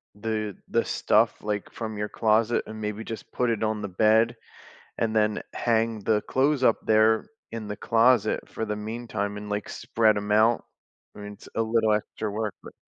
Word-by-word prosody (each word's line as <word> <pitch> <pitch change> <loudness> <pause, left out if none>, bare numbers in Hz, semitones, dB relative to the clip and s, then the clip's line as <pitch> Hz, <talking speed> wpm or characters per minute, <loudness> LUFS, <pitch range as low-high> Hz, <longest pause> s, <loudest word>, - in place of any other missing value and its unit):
the 110 -1 -3
the - - +1
stuff, - - +2
like, 105 -1 -3
from 110 -2 -5
your 105 0 -3
closet 110 +1 +2
and, 110 0 -8
maybe, 105 +1 -3
just 115 -1 -8
put 125 -1 0
it 110 -1 -1
on 110 -1 -1
the 100 - -3
bed 110 +5 +3 0.6
and 110 -1 -1
then 105 -1 +2
hang 115 -1 +1
the 105 0 +1
clothes 135 0 +1
up 115 - +5
there 110 0 +4 0.3
in 110 -2 -5
the 105 - -4
closet 115 -1 +2
for 110 - -4
the 105 - -2
meantime 105 -1 -4
and, 105 0 -7
like, 105 0 -3
spread 110 -2 +1
'em 105 0 -3
out. 110 +2 +3 0.5
I - - -11
mean, 105 0 -7
it's - - -15
a 115 - +1
little 110 -1 +2
extra 105 0 -3
work, 105 -1 -2
but - - -11
110 Hz, 190 wpm, -26 LUFS, 105-115 Hz, 0.6 s, up